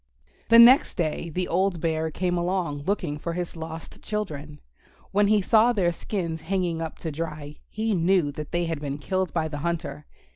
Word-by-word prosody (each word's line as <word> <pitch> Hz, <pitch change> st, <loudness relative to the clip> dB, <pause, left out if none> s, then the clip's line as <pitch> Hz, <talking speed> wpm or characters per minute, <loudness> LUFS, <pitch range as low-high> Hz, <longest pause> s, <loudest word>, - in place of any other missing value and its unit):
The 230 Hz, -, +8 dB
next 240 Hz, +3 st, +7 dB
day 165 Hz, 0 st, -2 dB
the 180 Hz, +3 st, -2 dB
old 185 Hz, 0 st, +1 dB
Bear 160 Hz, -1 st, 0 dB
came 175 Hz, +2 st, -1 dB
along, 175 Hz, -5 st, -1 dB
looking 175 Hz, -7 st, -1 dB
for 170 Hz, +2 st, -4 dB
his 175 Hz, 0 st, -4 dB
lost 160 Hz, 0 st, -8 dB
children. 155 Hz, -9 st, -5 dB, 0.5 s
When 205 Hz, +1 st, +3 dB
he 210 Hz, -1 st, +3 dB
saw 225 Hz, +4 st, +4 dB
their 180 Hz, -6 st, +2 dB
skins 170 Hz, -2 st, -4 dB
hanging 175 Hz, -3 st, -1 dB
up 160 Hz, -1 st, -5 dB
to 160 Hz, -, -1 dB
dry 150 Hz, -1 st, -6 dB
he 220 Hz, +1 st, -1 dB
knew 175 Hz, -3 st, +2 dB
that 150 Hz, +1 st, -7 dB
they 175 Hz, 0 st, 0 dB
had 165 Hz, -3 st, -3 dB
been 140 Hz, -1 st, -3 dB
killed 185 Hz, +4 st, -2 dB
by 160 Hz, -2 st, 0 dB
the 150 Hz, -2 st, -5 dB
hunter. 155 Hz, -3 st, -3 dB
170 Hz, 185 wpm, -25 LUFS, 155-190 Hz, 0.5 s, The